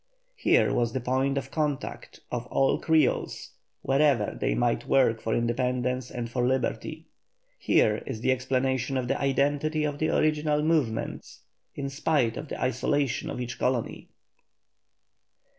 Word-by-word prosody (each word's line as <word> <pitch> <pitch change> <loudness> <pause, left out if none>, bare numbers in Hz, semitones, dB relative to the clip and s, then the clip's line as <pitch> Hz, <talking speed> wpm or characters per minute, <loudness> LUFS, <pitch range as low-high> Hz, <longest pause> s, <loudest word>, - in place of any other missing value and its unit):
Here 460 - +3
was 120 -1 0
the 130 - -1
point 130 +3 0
of 135 0 -4
contact 150 -3 -3
of 120 0 -3
all 135 - +2
Creoles, 160 -1 +1 0.3
wherever 135 -5 +2
they - - -1
might 120 -1 0
work 115 -4 +3
for 115 - -1
independence 125 +1 -1
and 120 -2 -4
for 120 +1 -2
liberty. 130 0 -1 0.5
Here 105 0 +2
is 110 - -5
the 130 - +2
explanation 130 +1 0
of 125 -1 -2
the 135 - -1
identity 145 +3 +1
of 145 -1 -2
the 155 - +1
original 150 -1 +1
movements 150 -9 -1 0.3
in 140 - -3
spite 135 -5 +1
of 155 - -6
the - - -6
isolation 130 +1 0
of - - -5
each 125 -1 -5
colony. 125 -2 -1
130 Hz, 140 wpm, -27 LUFS, 125-145 Hz, 0.5 s, Here